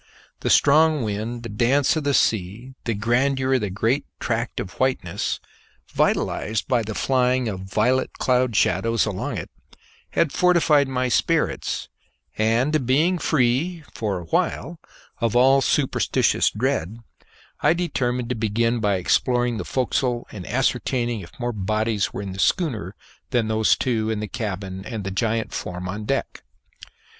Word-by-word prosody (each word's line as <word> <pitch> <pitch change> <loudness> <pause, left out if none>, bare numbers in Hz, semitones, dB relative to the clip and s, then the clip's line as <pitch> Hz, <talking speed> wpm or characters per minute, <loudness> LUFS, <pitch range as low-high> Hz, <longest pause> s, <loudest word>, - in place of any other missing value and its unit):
The - - -2
strong 155 -1 +4
wind, 110 +3 -3
the 115 - -6
dance 125 +8 +2
of 155 -2 -2
the 140 -1 +2
sea, 110 +5 0
the 115 - -1
grandeur 130 +5 +1
of 130 - +2
the 105 - -2
great 115 +9 0
tract 115 0 -2
of 90 - -7
whiteness, 130 -10 -1 0.5
vitalized 110 0 0
by 120 -2 +2
the 110 -1 -5
flying 125 -1 +1
of 100 -4 -3
violet 105 +7 0
cloud 125 -2 +1
shadows 115 +5 +2
along 100 -4 -3
it, - - -6 0.6
had 165 -4 +2
fortified 165 -5 +3
my 130 -1 -1
spirits, 120 - 0 0.5
and 120 +6 +1
being 160 +8 +3
free 155 +5 +1
(for 105 -4 -2
a 90 - -6
while) 160 - -1 0.4
of 115 -1 0
all 135 +2 +5
superstitious 135 0 +2
dread, 115 - -2 0.6
I - - +4
determined 125 -8 -1
to 125 - -1
begin 115 +2 0
by 105 -3 +1
exploring 120 +6 +1
the - - -4
forecastle 125 -1 -1
and 95 -4 -8
ascertaining 120 -1 0
if 85 - -11
more 120 -1 -2
bodies 110 +1 -1
were 100 - -5
in 95 -1 -5
the 95 - -8
schooner 110 - 0 0.3
than 120 -4 0
those 110 0 +3
two 110 -4 0
in 110 -1 -1
the 105 - -3
cabin 95 -4 -5
and 110 -2 -5
the 95 - -4
giant 110 +2 -1
form 90 0 -5
on 105 +3 -5
deck. 135 +5 -2
120 Hz, 150 wpm, -23 LUFS, 105-130 Hz, 0.6 s, all